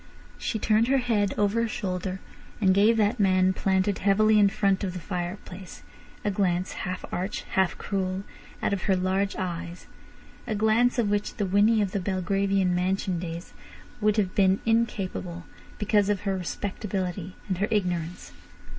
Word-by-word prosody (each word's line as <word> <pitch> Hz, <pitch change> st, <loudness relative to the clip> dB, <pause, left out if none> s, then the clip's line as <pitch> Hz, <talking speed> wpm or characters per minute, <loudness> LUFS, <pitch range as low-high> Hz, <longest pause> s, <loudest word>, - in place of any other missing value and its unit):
She 225 Hz, -, -2 dB
turned 215 Hz, +2 st, +2 dB
her 270 Hz, +1 st, +3 dB
head 225 Hz, -6 st, +1 dB
over 210 Hz, +2 st, +2 dB
her 230 Hz, -, +1 dB
shoulder 190 Hz, -4 st, -3 dB, 0.4 s
and 190 Hz, -3 st, +4 dB
gave 210 Hz, +4 st, +4 dB
that 220 Hz, +2 st, +2 dB
man 185 Hz, -1 st, +4 dB
planted 190 Hz, +1 st, +1 dB
heavily 215 Hz, +2 st, +4 dB
in 200 Hz, -1 st, +6 dB
front 195 Hz, -1 st, +1 dB
of 185 Hz, -2 st, -2 dB
the 180 Hz, -, -5 dB
fireplace 180 Hz, +1 st, -6 dB, 0.4 s
a 205 Hz, -, +2 dB
glance, 185 Hz, -2 st, 0 dB, 0.2 s
half 185 Hz, -, -4 dB
arch, 185 Hz, +3 st, -3 dB
half 190 Hz, -2 st, +1 dB
cruel, 190 Hz, -1 st, -2 dB, 0.4 s
out -, -, +1 dB
of 190 Hz, -, -2 dB
her 190 Hz, -, +5 dB
large 190 Hz, +2 st, 0 dB
eyes—a 180 Hz, +5 st, -7 dB
glance 220 Hz, +4 st, +3 dB
of 220 Hz, -4 st, +1 dB
which 205 Hz, 0 st, -1 dB
the 205 Hz, -, -1 dB
Winnie 205 Hz, +3 st, +4 dB
of 195 Hz, -, -3 dB
the 200 Hz, -, -1 dB
Belgravian 195 Hz, 0 st, +1 dB
mansion 185 Hz, 0 st, 0 dB
days 170 Hz, 0 st, -6 dB, 0.5 s
would 210 Hz, 0 st, +2 dB
have 195 Hz, -3 st, +1 dB
been 190 Hz, -1 st, +3 dB
incapable, 195 Hz, -6 st, -1 dB, 0.3 s
because 210 Hz, -1 st, +2 dB
of 205 Hz, -2 st, 0 dB
her 195 Hz, -2 st, -1 dB
respectability 185 Hz, 0 st, -4 dB
and 185 Hz, -3 st, -2 dB
her 205 Hz, -, +1 dB
ignorance. 180 Hz, -4 st, -2 dB
195 Hz, 160 wpm, -26 LUFS, 185-210 Hz, 0.5 s, in